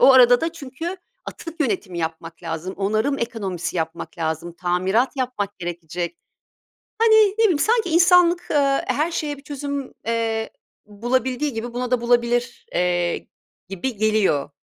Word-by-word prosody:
O 270 - +8
arada 245 -1 +7
da 330 0 -1
çünkü 325 +4 -6 0.3
atık 330 -1 -8
yönetimi 195 - -1
yapmak 165 +1 -5
lazım, 165 +3 -4
onarım 215 +8 0
ekonomisi 195 -8 -3
yapmak 165 +2 -4
lazım, 160 +1 -2
tamirat 185 +9 0
yapmak 245 -7 -3
gerekecek. 170 0 -4 0.8
Hani, 455 -1 +5 0.2
ne 450 - +4
bileyim 350 -9 +4
sanki 445 +2 +2
insanlık, 350 +1 +5
ııı, 275 -2 +3
her 310 +4 +1
şeye 295 -3 -2
bir 275 - -15
çözüm, 280 -1 -5
eee, 225 -1 -1 0.4
bulabildiği 255 +6 -1
gibi 235 +1 -5
buna 250 0 -2
da 250 - +2
bulabilir, 240 0 +1
eee, 175 -1 0 0.4
gibi 205 +5 -3
geliyor. 210 -10 +2
235 Hz, 140 wpm, -22 LUFS, 180-280 Hz, 0.8 s, O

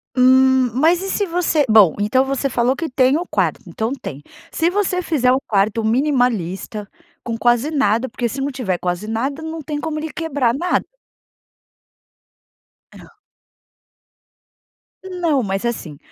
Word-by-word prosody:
Hum, 260 0 +4
mas 325 +8 +3
e 390 - -4
se 405 - 0
você 335 -4 +1
bom, 210 -7 +6
então 235 +6 +2
você 275 0 -1
falou 245 +1 +1
que 325 +2 -4
tem 260 +1 +3
o 350 - -3
quarto, - - -1
então 225 +4 -3
tem. 145 - -7 0.3
Se 335 +1 +1
você 365 -1 0
fizer 275 -8 +1
um 260 - +3
quarto 215 +2 +1
minimalista 225 - 0 0.4
com 230 -1 -4
quase 240 +5 +2
nada, 260 -4 +1
porque 240 0 -2
se 270 +4 -5
não 280 +1 -1
tiver 235 -9 -2
quase 180 +3 -3
nada 265 +7 -2
não 320 0 -6
tem 295 0 -4
como 310 -1 -3
ele 315 0 -5
quebrar 285 -8 -1
nada. 345 +7 0 2.1
Não. - - -15 1.9
Não, 350 -7 0
mas 195 -1 -3
assim, 180 -11 -4
260 Hz, 150 wpm, -19 LUFS, 225-310 Hz, 2.1 s, bom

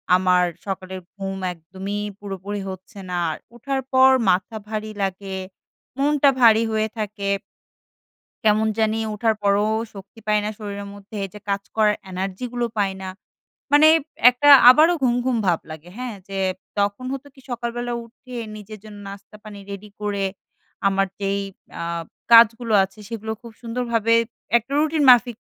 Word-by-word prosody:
আমার 180 -1 +3 0.2
সকালের 190 -1 -5 0.2
ঘুম 195 -1 -5 0.2
একদমই 190 +5 -6 0.2
পুরোপুরি 200 0 -5
হচ্ছে 190 +2 -10
না। 180 - -2
আর - - -5 0.2
ওঠার 270 +3 -2
পর 260 0 +7 0.2
মাথা 190 +5 +1
ভারী 215 0 -4
লাগে, 195 0 -4 0.6
মনটা 285 0 +3
ভারী 225 -1 +6
হয়ে 220 0 +1
থাকে 205 -1 -4 1.2
কেমন 215 +1 +3
জানি 220 0 +1 0.2
ওঠার 220 +1 +1
পরেও 205 +1 +2 0.2
শক্তি 200 +3 -12
পাই 210 0 +3
না 210 - -1
শরীরের 200 -1 -6
মধ্যে 205 +1 -14
এইযে 205 +2 -9
কাজ 200 0 0
করার 210 -1 +3
energy 190 +5 -4
গুলো 240 -1 -1
পাই 195 -1 +1
না। 190 - -5 0.6
মানে 305 +2 +7 0.4
একটা 290 +4 +1 0.2
আবারও 315 +6 +6
ঘুমঘুম 245 0 +1
ভাব 170 -2 +2
লাগে, 160 +3 -10
হ্যাঁ? 250 -3 -4
যে 195 0 -4 0.4
তখন 200 +4 0
হতো 275 +1 -6
কি 265 - -17
সকালবেলা 240 0 -3
উঠে 245 +1 -12 0.2
নিজের 215 +1 -10
জন্য 210 -1 -11
নাস্তা 200 +1 -11
পানি 210 -1 -9
রেডি 200 +1 -8
করে 200 -1 -1 0.6
আমার 195 0 +1
যেই 200 0 0 0.4
আ - - -3 0.5
কাজগুলো 230 0 +6
আছে 195 +3 -12
সেগুলো 220 -1 -4
খুব 235 -1 -11
সুন্দরভাবে 230 -1 0 0.4
একটা 240 +4 -2
রুটিন 310 0 +1
মাফিক 240 -2 +5
215 Hz, 150 wpm, -22 LUFS, 195-240 Hz, 1.2 s, পর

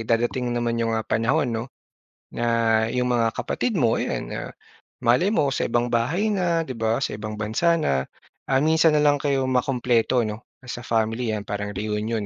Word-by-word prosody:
dadating 120 +2 0
naman 115 -1 -1
'yong 115 -1 0
mga 110 - -2
panahon 115 +1 +1
'no, 115 +1 -2 0.7
na 120 - -2 0.4
yung 125 0 0
mga 115 -1 +2
kapatid 225 -7 -1
mo, 115 -6 +2
'yan - - -2
ah, - - -5 0.5
malay 145 +12 +4
mo 145 -11 +1
sa - - -1
ibang 120 +1 +1
bahay 170 - +1
na, 170 -4 +1
'di 130 - -5
ba, 110 +1 +1
sa 135 - -2
ibang 105 0 -6
bansa 115 +11 +1
na, 70 - 0 0.4
ah, 130 - +3
minsan 160 0 +4
na - - +3
lang 145 -1 +3
kayo 135 -2 +1
makumpleto 125 -2 +1
'no, 105 +2 -5 0.2
as 125 - -6
a - - -13
family 115 +1 0
yan 105 -2 -3
parang 105 0 -4
reunion 105 +1 -2
120 Hz, 185 wpm, -24 LUFS, 110-140 Hz, 0.7 s, malay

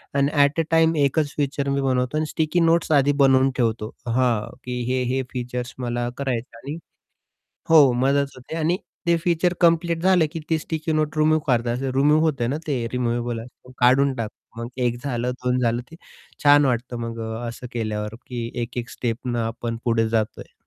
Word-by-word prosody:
आणि 140 0 +3
at 145 +3 +1
a, - - +3
time 165 0 +4
एकच 145 +1 0
feature 140 -1 -1
मी 140 0 0
बनवतो 130 +1 0
आणि 155 - 0
स्टिकी 160 +3 0
नोट्स 165 -1 +2
आधी 145 -1 +4
बनवून 135 0 +5
ठेवतो. 115 -2 0 0.2
हां, 120 -3 +1
की 125 -1 -4
हे 130 0 +1
हे 135 0 0
फीचर्स 125 0 -4
मला 120 -1 -2
करायचं 125 -4 -3
आणि 140 +7 -6 0.9
हो 150 -5 +7
मदत 140 +1 +2
होते 130 +4 -8
आणि 165 +2 +1 0.3
ते 170 - +5
फीचर 175 +1 +1
कंप्लीट 170 -1 +3
झाले, 185 -2 +4
की 165 +2 -6
ती 160 - +3
स्टिकी 160 0 -3
नोट 155 0 0
रिमूव्ह 155 0 +3
करत 120 -2 +2
असे. 125 +3 -1
रिमूव्ह 145 +4 +4
होतं 140 -6 0
आहे 120 - 0
ना, 145 - -1
ते 130 -6 -1
रिमूव्हेबल 120 -1 -1
असतं, 125 +2 -15
काढून 130 +3 +4
टाकतो. 115 0 -7
मग - - -4 0.2
एक 120 0 0
झालं, 125 -2 -1
2 125 0 +1
झालं. 120 0 +1
ते - - -10 0.5
छान 145 0 +6
वाटतं. 125 -1 -1
मग 115 0 -5
अ, 120 +2 -4
असं 120 +2 -7
केल्यावर, 110 -2 -3
की 120 -2 -4
एक-एक 120 +1 -4
स्टेपने 120 +1 -3
आपण 115 0 -4
पुढे 115 -1 +2
जातो 110 -2 -1
आहे. - - -14
130 Hz, 190 wpm, -23 LUFS, 120-150 Hz, 0.9 s, हो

